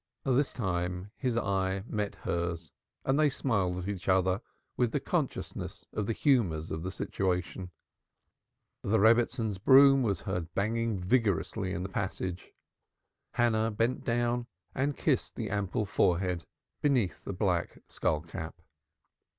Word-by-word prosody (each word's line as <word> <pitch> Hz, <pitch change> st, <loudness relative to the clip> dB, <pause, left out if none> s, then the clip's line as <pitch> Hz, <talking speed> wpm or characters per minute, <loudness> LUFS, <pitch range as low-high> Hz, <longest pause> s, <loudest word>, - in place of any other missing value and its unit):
This 135 Hz, +1 st, +2 dB
time 90 Hz, -2 st, -2 dB
his 125 Hz, -3 st, -1 dB
eye 95 Hz, -2 st, 0 dB
met 105 Hz, -3 st, -2 dB
hers, 85 Hz, -2 st, -3 dB, 0.3 s
and 135 Hz, +3 st, +2 dB
they 155 Hz, -1 st, +5 dB
smiled 100 Hz, -10 st, 0 dB
at 90 Hz, +1 st, -4 dB
each 100 Hz, -2 st, -3 dB
other 95 Hz, +2 st, +3 dB, 0.3 s
with 120 Hz, -3 st, +1 dB
the -, -, +2 dB
consciousness -, -, -3 dB
of 105 Hz, -2 st, -2 dB
the 115 Hz, -, +1 dB
humors 100 Hz, -, +2 dB
of 80 Hz, -, -3 dB
the 90 Hz, -, -3 dB
situation. 90 Hz, -1 st, -2 dB, 1.1 s
The 110 Hz, +3 st, +2 dB
Rebbitzin's 115 Hz, -1 st, +3 dB
broom 135 Hz, +4 st, +7 dB
was 105 Hz, -6 st, 0 dB
heard 90 Hz, -4 st, -3 dB
banging 115 Hz, +1 st, 0 dB
viciously 100 Hz, -1 st, +1 dB
in 90 Hz, -1 st, -2 dB
the -, -, -3 dB
passage. 90 Hz, -1 st, -3 dB, 0.8 s
Hannah 115 Hz, -2 st, +2 dB
bent 115 Hz, +4 st, 0 dB
down 120 Hz, 0 st, 0 dB, 0.3 s
and 140 Hz, +2 st, 0 dB
kissed -, -, 0 dB
the -, -, -4 dB
ample 100 Hz, +2 st, -1 dB
forehead 90 Hz, -2 st, +1 dB, 0.4 s
beneath 125 Hz, -, +1 dB
the -, -, -4 dB
black -, -, 0 dB
skull 75 Hz, -, 0 dB
cap. 85 Hz, 0 st, -7 dB
100 Hz, 135 wpm, -30 LUFS, 90-120 Hz, 1.1 s, broom